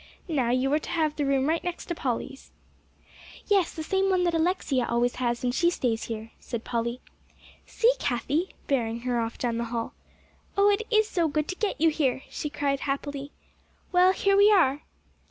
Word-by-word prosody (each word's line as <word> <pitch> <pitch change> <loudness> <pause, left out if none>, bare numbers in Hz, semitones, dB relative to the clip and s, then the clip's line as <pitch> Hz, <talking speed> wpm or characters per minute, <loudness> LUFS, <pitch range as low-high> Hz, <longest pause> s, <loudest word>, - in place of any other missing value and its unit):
"Now, 275 -8 0
you 255 +3 +1
are 300 - +3
to - - -9
have 315 -3 0
the 290 -2 -1
room 275 0 +2
right 325 +2 0
next 355 -1 -4
to 345 - -3
Polly's." 270 -2 -4 0.9
"Yes, 395 -5 +2
the 315 - -4
same 385 +3 +1
one 370 -1 +2
that 345 -1 +1
Alexia 320 -7 +1
always 240 +1 +1
has 240 -1 -1
when 250 - +1
she 340 +7 +2
stays 240 -9 -1
here," 225 0 -6
said 235 -2 -5
Polly. 235 +1 -2 0.7
"See, 475 +2 +3
Cathie," 285 +7 -1
bearing 235 -4 -1
her 245 -1 -1
off 230 0 -3
down 235 -2 -1
the 235 - -1
hall. 230 0 -4 0.6
"Oh, 400 +1 +5
it 440 +2 -1
is 435 -2 +3
so 345 -5 +1
good 300 0 -1
to 370 - -2
get 420 +1 -2
you 325 +1 +5
here," 270 -4 0
she 300 - -4
cried 280 -1 -1
happily. 280 0 -4 0.6
"Well, 365 +1 +5
here 395 +1 +2
we 405 +1 +6
are!" 300 -8 +4
285 Hz, 190 wpm, -27 LUFS, 245-355 Hz, 0.9 s, we